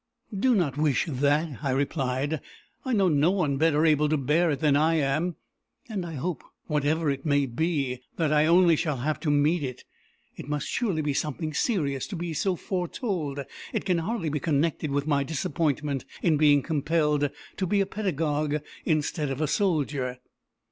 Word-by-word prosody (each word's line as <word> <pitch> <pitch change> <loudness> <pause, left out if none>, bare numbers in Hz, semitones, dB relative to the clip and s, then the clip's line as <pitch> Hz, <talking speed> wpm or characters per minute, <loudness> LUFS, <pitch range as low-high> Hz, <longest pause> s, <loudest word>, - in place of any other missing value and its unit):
"Do 245 +5 +3
not 150 -8 0
wish 150 -3 +2
that," 145 +1 0
I 140 - 0
replied. 135 +1 -1 0.4
"I 260 - -3
know 200 -5 +3
no 150 0 +3
one 165 -8 +1
better 155 +1 +3
able 150 -1 +3
to 155 - +2
bear 150 +6 +2
it 145 -3 -1
than 150 -2 +3
I 160 +3 +3
am; 155 +4 0 0.5
and 200 -6 -4
I 165 - -6
hope, 165 +5 -3 0.2
whatever 150 0 +1
it 135 0 -4
may 145 -2 +2
be, 135 -1 -1 0.2
that 155 -3 +1
I 150 +1 +4
only 170 0 +6
shall 150 -3 -1
have 150 +5 -1
to 160 - -2
meet 150 +3 +3
it. 130 -3 -5 0.5
It 140 - -9
must 150 -1 -1
surely 190 -11 -1
be 145 -1 0
something 155 +2 -2
serious 145 - 0
to 205 - -6
be 170 -1 -4
so 185 +5 0
foretold 175 - -3 0.3
it - - -2
can 180 -3 +2
hardly 185 -1 -2
be 150 0 -1
connected 155 +1 0
with 140 0 -1
my 145 -2 +2
disappointment 145 -2 -1 0.2
in 165 -3 +4
being 145 -2 +4
compelled 150 -1 +1 0.3
to 190 - -1
be 205 +3 +2
a 195 - +3
pedagogue 155 -7 -1 0.3
instead 155 -1 0
of 135 0 -3
a 155 - +1
soldier." 145 -8 0
150 Hz, 180 wpm, -27 LUFS, 145-170 Hz, 0.5 s, only